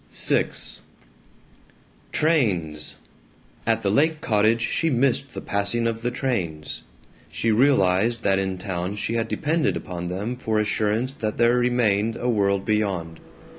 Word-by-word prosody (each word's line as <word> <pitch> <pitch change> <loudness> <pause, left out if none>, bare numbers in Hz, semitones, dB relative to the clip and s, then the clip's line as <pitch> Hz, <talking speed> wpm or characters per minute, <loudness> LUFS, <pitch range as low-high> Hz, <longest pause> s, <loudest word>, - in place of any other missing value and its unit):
VI - - +2 1.6
Trains! 95 - 0 0.7
At 115 -1 +1
the 100 - +1
lake 155 +7 +2
cottage 110 0 +2
she 165 +7 0
missed 135 0 +1
the - - -4
passing 100 +4 0
of 115 -1 -1
the 120 - 0
trains. 95 - -3 0.5
She 80 +9 0
realized 115 -2 +3
that 95 -1 +3
in 95 -1 -2
town 90 +1 -3
she 105 +2 -2
had 115 0 0
depended 155 +3 0
upon 90 -1 -6
them 100 +7 -3
for 110 -3 -1
assurance 110 +4 0
that 110 -7 -3
there 120 +1 +4
remained 115 -3 +1
a 125 - -3
world 100 -3 +1
beyond. 95 -6 -1
110 Hz, 135 wpm, -24 LUFS, 95-120 Hz, 1.6 s, there